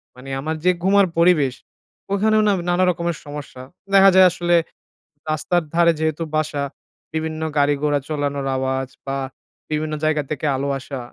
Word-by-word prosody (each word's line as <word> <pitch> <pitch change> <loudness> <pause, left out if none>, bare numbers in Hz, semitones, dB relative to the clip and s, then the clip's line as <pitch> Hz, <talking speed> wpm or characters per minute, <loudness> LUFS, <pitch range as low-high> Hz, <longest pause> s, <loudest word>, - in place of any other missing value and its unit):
মানে 130 +2 -11
আমার 160 +3 -2
যে 180 - +6
ঘুমের 200 +1 +5
পরিবেশ, 165 -6 +4 0.6
ওইখানেও 215 +2 +3
না 205 - +4 0.2
নানা 175 +1 +2
রকমের 170 -1 -3
সমস্যা। 145 -3 -8 0.3
দেখা 195 0 +8
যায় 190 0 +8
আসলে, 175 0 +1 0.7
রাস্তার 170 +3 0
ধারে 170 0 +4
যেহেতু 160 +1 -1
বাসা, 155 -2 -1 0.5
বিভিন্ন 160 0 -3 0.2
গাড়ি-ঘোড়া 145 0 +2
চালানোর 145 -2 -2
আওয়াজ 130 0 -1 0.2
বা 135 0 -2 0.5
বিভিন্ন 155 0 -1
জায়গা 155 -1 +1
থেকে 155 0 -3
আলো 135 +2 -2
আসা। 135 0 -7
155 Hz, 145 wpm, -21 LUFS, 145-175 Hz, 0.7 s, দেখা